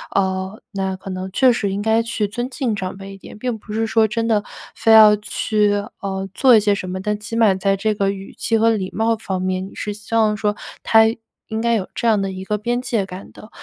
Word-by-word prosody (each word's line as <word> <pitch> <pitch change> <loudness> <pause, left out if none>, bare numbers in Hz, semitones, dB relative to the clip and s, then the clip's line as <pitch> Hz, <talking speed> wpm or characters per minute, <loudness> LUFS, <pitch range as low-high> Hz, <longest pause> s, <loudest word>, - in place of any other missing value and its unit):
呃， 190 +1 -1
那 190 -1 -2
可 190 0 -8
能 185 0 -5
确 255 +4 +4
实 205 -4 -1
应 195 - -2
该 220 +2 +2
去 225 -2 -2
尊 240 +5 -4
敬 255 -5 -2
长 190 -1 -5
辈 195 0 -9
一 195 - -11
点， 210 - -12
并 245 0 -2
不 210 - -12
是 225 +1 0
说 220 0 +3
真 230 +1 -2
的 215 -2 +2 0.3
非 225 - +1
要 215 -1 +9
去， 210 0 0 0.3
呃， 195 -1 -4
做 255 0 +5
一 - - +7
些 205 -1 +2
什 185 -2 -4
么。 185 +1 -4
但 210 +2 -2
起 230 +2 -6
码 220 -4 +4
在 195 +1 0
这 215 +2 0
个 200 -1 0
语 195 0 -6
气 225 - 0
和 225 +1 +4
礼 195 -4 -2
貌 225 +1 +2
方 195 -4 -4
面， 185 0 -1
你 - - -16
是 210 - -4
希 210 +2 -6
望 215 -2 +3
说 210 0 -1 0.3
他 225 0 +5 0.5
应 220 0 -2
该 235 0 +1
有 200 -4 -1
这 235 - -1
样 215 -3 +3
的 195 -1 -2
一 190 0 -7
个 210 +1 -1
边 240 +3 -1
界 230 -6 -1
感 185 +1 -10
的。 215 - -14
210 Hz, 270 characters per minute, -20 LUFS, 195-225 Hz, 0.5 s, 要